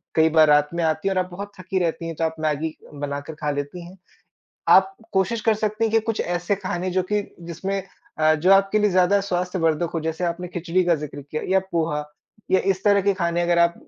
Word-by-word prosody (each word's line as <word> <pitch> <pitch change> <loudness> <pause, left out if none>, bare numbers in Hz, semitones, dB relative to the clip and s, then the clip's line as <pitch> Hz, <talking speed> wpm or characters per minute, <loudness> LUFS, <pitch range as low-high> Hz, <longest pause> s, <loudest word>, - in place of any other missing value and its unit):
कई 160 0 +5
बार 160 -1 +5
रात 150 0 +4
में 170 -1 -1
आती 160 +4 0
हैं 195 - +1
और 185 - +2
आप 180 - -13
बहुत 200 +3 -7
थकी 185 +1 -2
रहती 170 -1 -1
हैं, 165 - -5
तो 165 - -3
आप 160 0 -1
मैगी 155 0 -1 0.2
बनाकर 145 +1 -5
खा 150 -1 0
लेती 145 +5 -5
हैं। 190 +2 -14 0.7
आप 195 0 +5 0.2
कोशिश 190 +4 +1
कर 225 - +3
सकती 215 +1 -1
हैं 225 - +1
कि 225 - +5
कुछ 225 -1 -2
ऐसे 175 +3 -1
खाने 185 -1 -3
जो 185 +1 +1
कि 210 - +2 0.3
जिसमें 195 +4 -3 0.4
अ, 155 0 +5
जो 175 +5 +2
आपके 195 +2 +3
लिए 210 0 +3
ज़्यादा 185 +2 +3
स्वास्थ्य 180 -1 -2
वर्धक 165 +1 +1
हो 165 - 0
जैसे 160 +2 -3
आपने 175 +1 -3
खिचड़ी 175 +1 0
का 175 - +4
जिक्र 145 -1 -7
किया 150 +3 -5
या 190 0 +4
पोहा 160 -3 0 0.5
या 190 - +5
इस 190 0 -5
तरह 200 -1 +4
के 200 +1 +2
खाने 170 -2 0
अगर 175 0 +2
आप 170 0 +4
175 Hz, 235 wpm, -23 LUFS, 160-195 Hz, 0.7 s, कई